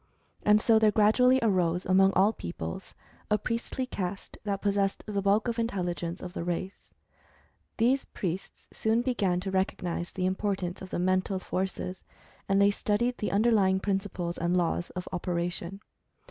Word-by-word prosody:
And, 210 0 +5
so, 220 0 +4
there 220 -1 +5
gradually 225 +5 +4
arose, 180 -5 +1
among 190 +1 +5
all 200 +4 +4
peoples, 80 - -6 0.3
a 210 - +3
priestly 230 +4 -3
caste 190 -5 -5
that 200 -1 -1
possessed 200 -1 +1
the 205 -2 -2
bulk 200 +4 +2
of 235 0 -1
intelligence 175 -5 -2
of 180 -1 -7
the - - -4
race. 175 +2 -4 0.9
These 255 +4 +2
priests 185 0 -5
soon 225 +2 +1
began 200 -8 +1
to 190 0 -4
recognize 180 -2 -1
the 185 - -2
im 185 0 +1
y/ 205 -2 +1
portance 180 -1 -5
of 190 - -8
the - - -3
Mental 185 +2 +1
Forces, 185 0 -3 0.5
and 195 0 +3
they 200 0 +5
studied 235 +5 0
the 210 - -1
underlying 200 -3 +3
principles 190 -3 -2
and 175 +2 +1
laws 175 0 0
of 180 - -5
operation. 175 +1 -3
195 Hz, 160 wpm, -28 LUFS, 180-210 Hz, 0.9 s, And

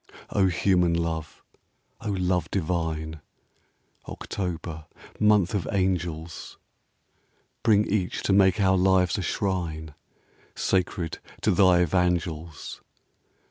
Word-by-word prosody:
Oh, 95 -2 +3
human 90 -2 +2
love! 80 -1 -3 0.6
Oh, 110 - -3
love 90 -2 0
divine! 80 -3 -2 0.9
October, 85 -4 -5 0.3
month 105 -4 +4
of 100 -6 -1
angels, 90 -4 -2 1.0
Bring 105 -2 +4
each 95 -3 -1
to 100 - +2
make 95 +1 +4
our 95 -1 +4
lives 95 +1 +3
a - - -1
shrine 85 -6 -2 0.6
Sacred 90 -3 -1 0.2
to 105 - +2
thy 90 -2 +5
Evangels 85 -2 -1
90 Hz, 100 wpm, -26 LUFS, 80-95 Hz, 1.0 s, thy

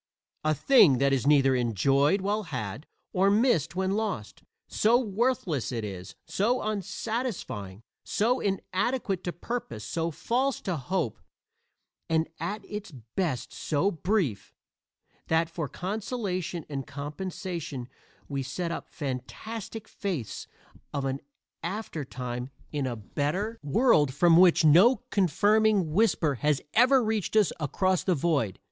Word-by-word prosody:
A 155 0 +2
thing 205 - +6
that 140 +1 +3
is 135 0 0
neither 135 -2 +5
enjoyed 135 - +2
while 205 +3 0
had, 125 - -5 0.3
or 190 +2 +4
missed 200 - +2
when 190 +1 0
lost. 200 - -3 0.3
So 225 +3 +3
worthless 210 - 0
it 115 -3 -3
is, 95 -3 -7
so 240 +6 +1
unsatisfying, 200 - -3 0.2
so 245 +5 +1
inadequate 195 +1 -1
to 175 - -1
purpose, 175 - -5
so 165 +6 -1
false 250 - 0
to 185 - -2
hope 145 - -2 0.9
and 160 0 +2
at 200 +6 -4
its 210 -2 -6 0.2
best 165 -10 -1
so 155 +6 0
brief, 170 - -1 0.7
that 160 +1 +2
for 155 -5 -3
consolation 190 -4 -3
and 140 -2 -5
compensation 150 -1 -5 0.4
we 140 -1 -2
set 165 +6 -3
up - - -5
fantastic 195 - -6
faiths 175 - -4 0.5
of 140 -1 -1
an 135 0 -1 0.4
aftertime 130 - -4 0.2
in 145 -3 -1
a 120 - -3
better 155 - -2
world 150 - +3
from 170 +2 +5
which 175 -2 +6
no 200 - +6
confirming 205 0 +3
whisper 180 -7 +3
has 150 -2 +2
ever 255 +2 +5
reached 215 -2 -1
us 215 -4 +4
across 185 +4 +1
the 185 - +2
void. 140 - 0
175 Hz, 125 wpm, -28 LUFS, 140-210 Hz, 0.9 s, thing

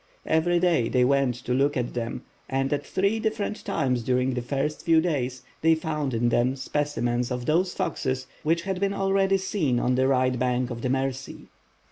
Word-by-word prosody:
Every 175 +2 +2
day 170 -10 +2
they 125 -1 +3
went 135 -2 +2
to 125 - 0
look 140 +3 +2
at 120 -1 -2
them, 120 0 -4 0.3
and 135 +1 0
at 145 - -1
three 200 +4 0
different 215 -1 -2
times 125 -3 0
during 125 +2 +1
the 125 - -2
first 140 +4 -2
few 165 -1 +5
days 130 -7 -1 0.2
they 160 0 +5
found 150 -5 -2
in 120 +1 +2
them 125 +3 +2
specimens 125 -4 -1
of 125 -1 -3
those 180 +6 +1
foxes 130 -2 -2 0.2
which 165 +2 +1
had 190 -1 -2
been 200 0 0
already 195 0 +2
seen 180 -10 0
on 125 - +1
the 130 +1 +2
right 130 -2 +2
bank 125 0 0
of 115 -1 -5
the 130 - -1
Mercy. 135 0 -3
135 Hz, 190 wpm, -26 LUFS, 125-165 Hz, 0.3 s, few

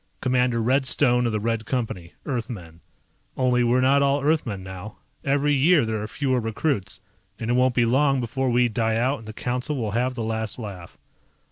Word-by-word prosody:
Commander 125 -2 +1
Red 130 +3 +2
Stone 125 -1 +3
of - - -1
the 105 - -1
Red 115 0 -2
Company, 110 -9 -3
Earthmen. 105 - -5 0.6
Only 125 -1 +2
we're 120 +2 +3
not 135 +2 +4
all 140 0 +2
Earthmen 135 -11 0
now, 95 +3 -9 0.3
every 145 +1 +2
year 145 0 +4
there 110 -1 -2
are 105 - -4
fewer 130 +1 0
recruits, 110 - -2 0.4
and 115 +1 -3
it - - +3
won't 125 0 +3
be 120 - +3
long 135 +3 +3
before 130 +2 -1
we 120 0 +3
die 115 -1 0
out 130 +5 +1
and 110 - -13
the - - -5
Council 125 +6 -3
will 110 -4 -2
have 125 +4 0
the 115 - -3
last 110 -1 -2
laugh. 100 -7 -8
120 Hz, 195 wpm, -24 LUFS, 110-130 Hz, 0.6 s, not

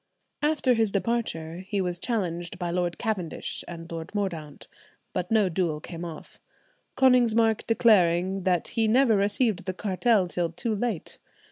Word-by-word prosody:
After 295 -4 +2
his 225 -3 +1
departure 195 -7 -2
he 205 -1 -1
was 180 -2 -2
challenged 175 -7 -2
by 175 -1 -3
Lord 175 -1 -1
Cavendish 200 -8 -3
and 170 -1 -9
Lord 165 +4 -7
Mordaunt, 165 -8 -4 0.5
but 180 - -2
no 220 -3 +3
duel 170 -3 -1
came 165 +2 -8
off, 165 -3 -9 0.6
Konigsmark 230 -4 +4
declaring 190 -5 +3
that 180 -1 +1
he 225 -1 +1
never 240 0 +4
received 205 0 +1
the 185 -1 -3
cartel 200 0 +2
till 175 -1 -1
too 215 +7 -2
late. 215 -4 -3
190 Hz, 145 wpm, -26 LUFS, 175-225 Hz, 0.6 s, Konigsmark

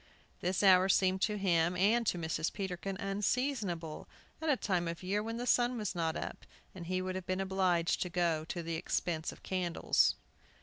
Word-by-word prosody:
This 180 +3 0
hour 190 -1 +6
seemed 190 0 +3
to 210 +1 +1
him 175 -3 +2
and 225 +5 +3
to 180 - +1
Mrs. 160 -1 -1
Peterkin 190 -1 -4
unseasonable, 195 - -2 0.3
at 320 - -1
a 280 - +4
time 180 -6 0
of 170 +2 -5
year 200 +3 0
when 225 +2 -4
the 245 - -3
sun 245 0 +3
was 210 -3 -2
not 165 -2 -1
up, - - -5 0.3
and 170 -3 -8
he 185 0 -1
would 185 0 -3
have 185 -1 -6
been 185 0 -1
obliged 185 -3 +1
to 180 - -1
go 170 -3 +1
to 170 +1 -4
the 165 0 -4
expense 160 0 -2
of - - -15
candles. 180 -3 +2
185 Hz, 190 wpm, -33 LUFS, 170-200 Hz, 0.3 s, hour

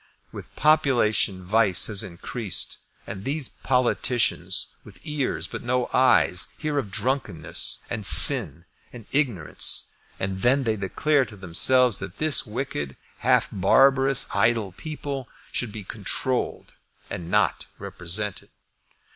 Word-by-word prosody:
With - - -11
population 120 -11 +2
vice 100 -1 +2
has 105 -3 0
increased, 100 +3 -3 0.3
and 95 0 -8
these 140 +1 -1
politicians, 125 -2 0
with - - -15
ears 150 -4 -3
but - - -7
no 125 +1 -1
eyes, 125 -8 +3
hear 150 -2 -2
of 110 - -5
drunkenness 115 - -1
and - - -5
sin - - +6 0.3
and 120 -4 -12
ignorance. 125 - +1 0.3
And 95 0 -3
then 135 +3 +2
they 110 -3 0
declare 135 +9 0
to 105 -4 -13
themselves 115 +6 +2
that 95 0 -8
this 155 -4 +2
wicked, 105 - -5 0.2
half - - +2
barbarous, 135 +7 +3
idle 110 0 +1
people 140 - -6 0.2
should 120 -4 -2
be 105 -1 -8
controlled 110 +6 -2 0.3
and 85 -1 -7
not 105 -1 0
represented. 90 +3 -4
115 Hz, 120 wpm, -24 LUFS, 95-135 Hz, 0.3 s, sin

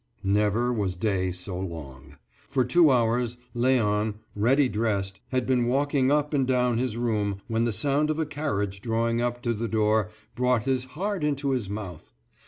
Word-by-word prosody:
Never 105 +5 +2
was 100 -5 -1
day 95 -1 0
so 90 +1 -6
long. 75 -8 -8 0.3
For 130 -2 +1
two 160 +5 +5
hours 120 -1 +1 0.2
Léon, 110 -4 +2 0.2
ready 130 +7 +3
dressed, 100 -4 -2
had 130 -2 -1
been 125 -2 +2
walking 135 +1 +2
up 150 +1 +1
and 135 -3 +2
down 125 -2 +2
his 125 -3 -2
room 105 -4 -1
when 115 +1 +1
the 120 - +1
sound 145 +6 +1
of 155 - 0
a 160 - 0
carriage 105 -10 -3
drawing 115 +1 0
up 120 0 -2
to 120 - +1
the 115 +1 -3
door 110 -2 +2 0.2
brought 125 -2 +1
his 130 -1 0
heart 200 -2 -2
into 140 -2 0
his 120 -7 -1
mouth. 100 -6 -7
120 Hz, 175 wpm, -26 LUFS, 105-130 Hz, 0.3 s, two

